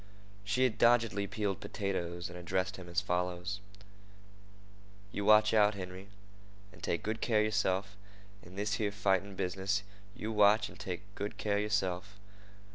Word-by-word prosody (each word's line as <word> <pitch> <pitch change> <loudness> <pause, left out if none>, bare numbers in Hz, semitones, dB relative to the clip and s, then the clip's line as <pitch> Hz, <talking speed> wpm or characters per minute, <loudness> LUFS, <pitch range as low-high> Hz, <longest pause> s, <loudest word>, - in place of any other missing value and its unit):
She 100 +6 +1
had 120 -3 +1
doggedly 115 -4 +4
peeled 100 -2 -2
potatoes 85 -3 -3
and 90 - -10
addressed 90 +3 -2
him 90 -2 -9
as 85 +3 +1
follows: 90 +1 -2 1.5
"You 100 - -3
watch 105 0 +6
out, 105 -1 +5
Henry, 95 0 -7 0.7
an' - - -16
take 85 - -1
good 110 +1 -2
care 115 -3 +2
of - - +3
yerself 100 -2 0 0.5
in 90 +2 -14
this 105 +1 -1
here 105 -1 +1
fighting 100 -1 0
business—you 100 +3 -3
watch, 105 0 +4
an' - - -14
take 90 +2 -5
good 100 +1 -5
care 100 -1 0
of - - +1
yerself. 100 -1 -1
100 Hz, 150 wpm, -33 LUFS, 95-105 Hz, 1.5 s, watch